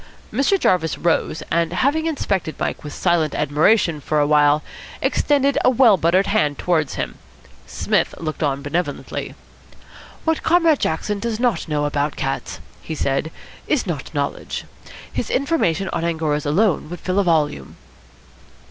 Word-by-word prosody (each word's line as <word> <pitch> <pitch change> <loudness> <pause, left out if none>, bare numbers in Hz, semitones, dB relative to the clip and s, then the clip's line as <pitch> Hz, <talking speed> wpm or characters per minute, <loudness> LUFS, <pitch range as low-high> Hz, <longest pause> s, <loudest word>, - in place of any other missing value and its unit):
Mr. 280 - +2
Jarvis 170 - +1
rose, 165 -2 0
and, 170 0 +1
having 290 - +1
inspected 195 - -2
Mike - - -3
with 150 - -7
silent 170 -3 +1
admiration 155 +3 +2
for 150 +2 0
a 145 - +3
while, 150 0 +4 0.4
extended 280 -1 +2
a - - +6
well 245 -4 +5
buttered 180 +3 +2
hand 150 -8 +1
towards 160 -5 0
him. - - -4 0.5
Psmith - - 0
looked 155 -2 -5
on 140 -2 0
benevolently. 165 +5 -3 0.9
"What 320 -1 +1
Comrade 330 -3 +3
Jackson 200 +6 -1
does 225 +1 -3
not 240 -10 0
know 150 -1 0
about 145 0 -1
cats," 135 - -3 0.2
he 160 - -5
said, 140 +1 -1 0.4
"is 300 -6 +1
not 160 -8 -4
knowledge. 140 -2 -3 0.5
His - - -3
information 255 - +1
on - - -2
Angoras 160 -3 -1
alone 170 0 +1
would 175 - -7
fill 185 +2 0
a - - +3
volume." 150 - 0
165 Hz, 150 wpm, -21 LUFS, 150-220 Hz, 0.9 s, a